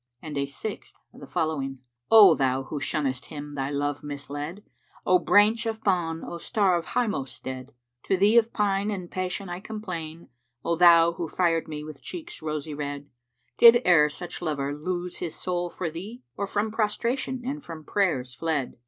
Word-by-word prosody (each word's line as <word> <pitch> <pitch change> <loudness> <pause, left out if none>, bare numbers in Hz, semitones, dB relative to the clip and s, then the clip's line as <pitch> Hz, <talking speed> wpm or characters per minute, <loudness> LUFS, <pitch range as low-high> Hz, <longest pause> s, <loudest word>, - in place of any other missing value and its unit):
And 150 +1 -7
a 140 0 -1
sixth 200 +10 -7 0.2
the 140 - -11
following, 135 -3 -2 0.3
"O 210 -6 +9
thou 135 -2 +1
who 145 +2 -5
shunnest 135 -2 -2
him 145 -1 -8
thy 135 -1 -2
love 145 0 -2
misled! 145 +5 -6 0.2
* - - -29
O 180 0 +5
Branch 210 +5 +4
of 220 -1 -4
Bán, 170 -4 0
O 170 - -6
star 195 0 +2
of 170 -1 -2
highmost 140 - -1
stead! 130 +1 -7 0.3
To 190 - +2
thee 205 +4 +4
of 230 0 -2
pine 200 -1 +1
and 185 -4 -5
passion 185 +1 -3
I 175 0 -5
complain, 180 -7 -7 0.2
* 125 -1 -38
O 170 - +1
thou 170 -1 +7
who 170 0 -4
fired 165 -3 +1
me 150 -1 -6
with 155 -2 -10
cheeks 350 0 -8
rosy 155 -1 -4
red. 145 -1 -5 0.5
Did 235 +1 +8
e'er 150 -4 +6
such 175 +4 -7
lover 145 -4 -2
lose 175 +3 -4
his 170 -3 -4
soul 175 -1 -2
for 170 -2 -4
thee, 210 +10 -8
* - - -56
Or 200 - -2
from 210 +2 -1
prostration 235 +4 -1
and 285 +2 -4
from 165 -2 -9
prayers 150 -11 0
fled?" 155 -3 -2
170 Hz, 185 wpm, -26 LUFS, 145-200 Hz, 0.5 s, O